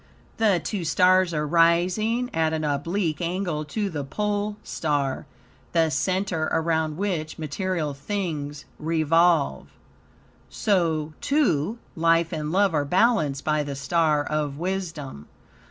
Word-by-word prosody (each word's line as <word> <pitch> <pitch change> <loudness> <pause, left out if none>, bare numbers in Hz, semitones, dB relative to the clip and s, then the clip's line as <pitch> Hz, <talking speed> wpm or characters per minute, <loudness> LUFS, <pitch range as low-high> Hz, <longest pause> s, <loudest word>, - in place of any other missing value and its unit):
The 210 -5 +3
two 200 -1 -3
stars 185 +2 +4
are 150 -2 -1
rising 180 - +2
at 160 -1 +1
an 155 -1 -1
oblique 155 +3 -1
angle 175 -3 -2
to 205 +7 -2
the 155 -7 -4
pole 205 +7 -2
star, 145 -4 -2 0.5
the 165 -2 +3
center 180 +3 0
around 160 -1 0
which, 175 -6 -2
material 160 0 -2
things 150 -2 -4
revolve. 165 0 +2 0.8
So, 165 -7 0
too, 230 - +1 0.2
life 165 0 +2
and 155 -1 -3
love 195 0 +3
are 150 -2 +2
balanced 180 - +2
by 155 -1 +1
the 145 -1 -4
star 150 +1 +1
of 150 -2 -2
wisdom. 165 - -4
165 Hz, 120 wpm, -25 LUFS, 150-185 Hz, 0.8 s, stars